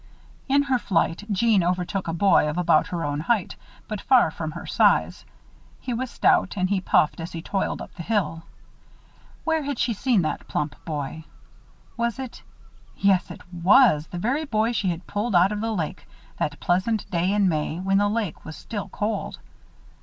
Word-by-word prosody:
In 280 Hz, +1 st, +4 dB
her 265 Hz, -3 st, +1 dB
flight, 180 Hz, -1 st, 0 dB
Jeanne 205 Hz, -1 st, +3 dB
overtook 180 Hz, +2 st, -1 dB
a -, -, -1 dB
boy 170 Hz, -3 st, +3 dB
of 150 Hz, -, -4 dB
about 170 Hz, -3 st, +3 dB
her 170 Hz, -3 st, -3 dB
own 145 Hz, 0 st, -2 dB
height, 205 Hz, +4 st, 0 dB, 0.3 s
but 215 Hz, -2 st, -5 dB
far 255 Hz, -, +4 dB
from 155 Hz, -1 st, -5 dB
her 170 Hz, -, -7 dB
own -, -, -10 dB
size. -, -, +2 dB, 0.5 s
He 250 Hz, -, -4 dB
was 255 Hz, +2 st, -3 dB
stout 200 Hz, -3 st, +2 dB
and 185 Hz, +1 st, 0 dB
he 195 Hz, -2 st, +1 dB
puffed 155 Hz, -, +2 dB
as 165 Hz, +1 st, -6 dB
he 165 Hz, -1 st, -6 dB
toiled 195 Hz, +1 st, -2 dB
up -, -, -13 dB
the 175 Hz, -, -8 dB
hill. 190 Hz, -4 st, -1 dB, 1.0 s
Where 320 Hz, -1 st, +1 dB
had 285 Hz, -2 st, -3 dB
she 235 Hz, 0 st, +1 dB
seen 220 Hz, -3 st, +1 dB
that 155 Hz, -, -3 dB
plump 150 Hz, 0 st, -2 dB
boy? 155 Hz, 0 st, -5 dB, 0.7 s
Was 235 Hz, 0 st, -1 dB
it 260 Hz, -3 st, -7 dB, 0.6 s
yes, 195 Hz, -2 st, +2 dB
it -, -, -9 dB
was 175 Hz, -, +5 dB
the 175 Hz, -, -7 dB
very 255 Hz, -, 0 dB
boy 220 Hz, -3 st, +1 dB
she 210 Hz, -5 st, 0 dB
had 170 Hz, 0 st, -4 dB
pulled 205 Hz, 0 st, -2 dB
out 180 Hz, +3 st, +5 dB
of 210 Hz, 0 st, -3 dB
the 225 Hz, 0 st, -1 dB
lake, 170 Hz, -8 st, -4 dB, 0.3 s
that 145 Hz, -1 st, -2 dB
pleasant 190 Hz, +5 st, 0 dB
day 180 Hz, +1 st, +1 dB
in 205 Hz, -1 st, +3 dB
May, 155 Hz, 0 st, -1 dB
when 195 Hz, +1 st, +2 dB
the 205 Hz, 0 st, +2 dB
lake 210 Hz, -6 st, -3 dB
was 160 Hz, -, -8 dB
still 205 Hz, -3 st, -6 dB
cold. 210 Hz, -1 st, -3 dB
195 Hz, 190 wpm, -24 LUFS, 170-225 Hz, 1.0 s, was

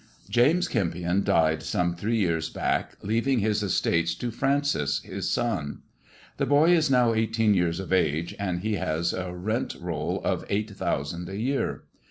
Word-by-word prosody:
"James 150 Hz, +10 st, +4 dB
Kempion 90 Hz, +1 st, 0 dB
died 80 Hz, -5 st, +2 dB
some 90 Hz, -1 st, 0 dB
three 105 Hz, +7 st, -1 dB
years 85 Hz, -5 st, 0 dB
back, -, -, -1 dB
leaving 115 Hz, +6 st, +1 dB
his 105 Hz, -1 st, +1 dB
estates 85 Hz, -4 st, +1 dB
to 120 Hz, +7 st, -4 dB
Francis 135 Hz, -, +1 dB
his -, -, -4 dB
son. 110 Hz, -12 st, -2 dB, 0.5 s
The -, -, 0 dB
boy 150 Hz, +4 st, +5 dB
is 160 Hz, -4 st, +4 dB
now 125 Hz, -3 st, +4 dB
eighteen 110 Hz, -1 st, +2 dB
years 90 Hz, -2 st, +1 dB
of 95 Hz, -1 st, -3 dB
age, 80 Hz, -2 st, +1 dB
and 90 Hz, -1 st, -2 dB
ho 110 Hz, -1 st, 0 dB
has 80 Hz, +2 st, 0 dB
a 95 Hz, -1 st, -4 dB
rent 110 Hz, +8 st, -2 dB
roll 85 Hz, -4 st, -2 dB
of -, -, 0 dB
eight 105 Hz, +2 st, -1 dB
thousand 85 Hz, -2 st, -3 dB
a 95 Hz, -, -5 dB
year. 135 Hz, +6 st, -1 dB
100 Hz, 165 wpm, -26 LUFS, 85-115 Hz, 0.5 s, boy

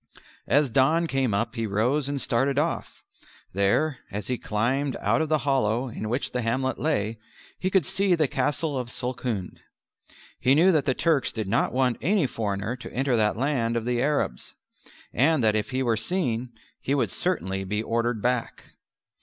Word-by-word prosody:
As 145 Hz, -3 st, +3 dB
dawn 155 Hz, +8 st, +3 dB
came 135 Hz, -6 st, 0 dB
up 115 Hz, +4 st, -1 dB
he 115 Hz, -2 st, -2 dB
rose 125 Hz, +8 st, +1 dB
and 140 Hz, -1 st, -2 dB
started 135 Hz, +3 st, 0 dB
off: 155 Hz, +3 st, -2 dB, 0.5 s
there 100 Hz, +10 st, +1 dB
(as 105 Hz, +1 st, -5 dB
he 125 Hz, -, -1 dB
climbed 130 Hz, +6 st, -1 dB
out 115 Hz, +4 st, +1 dB
of 160 Hz, -, -1 dB
the 155 Hz, -, +3 dB
hollow 130 Hz, -2 st, +1 dB
in 110 Hz, -1 st, -5 dB
which 125 Hz, +5 st, -1 dB
the 125 Hz, -, -1 dB
hamlet 130 Hz, +3 st, -1 dB
lay) 115 Hz, -8 st, -1 dB, 0.4 s
he 185 Hz, -, 0 dB
could 190 Hz, -5 st, +2 dB
see 195 Hz, -2 st, +2 dB
the 155 Hz, -3 st, +2 dB
Castle 145 Hz, -1 st, -1 dB
Sulkhund. 120 Hz, -6 st, -4 dB, 0.8 s
He 130 Hz, +2 st, +4 dB
knew 175 Hz, +5 st, +5 dB
that 155 Hz, -5 st, +2 dB
the 130 Hz, -3 st, +1 dB
Turks 160 Hz, -5 st, +2 dB
did 110 Hz, -3 st, -4 dB
not 115 Hz, +6 st, +1 dB
want 130 Hz, -2 st, +1 dB
any 190 Hz, +1 st, +2 dB
foreigner 110 Hz, -1 st, -2 dB
to 125 Hz, -, -9 dB
enter 130 Hz, 0 st, 0 dB
that 105 Hz, -1 st, +1 dB
land 120 Hz, -3 st, 0 dB
of 115 Hz, -, -3 dB
the 120 Hz, 0 st, 0 dB
Arabs, 140 Hz, -, -1 dB, 0.6 s
and 140 Hz, +2 st, +3 dB
that 110 Hz, -1 st, +3 dB
if 105 Hz, -1 st, -1 dB
he 130 Hz, 0 st, -1 dB
were 115 Hz, -3 st, +2 dB
seen, 125 Hz, -, -1 dB, 0.3 s
he 140 Hz, -, -1 dB
would 120 Hz, -8 st, 0 dB
certainly 95 Hz, +2 st, -1 dB
be 105 Hz, +3 st, -2 dB
ordered 115 Hz, -1 st, -1 dB
back. 125 Hz, -1 st, -2 dB
125 Hz, 180 wpm, -26 LUFS, 110-145 Hz, 0.8 s, knew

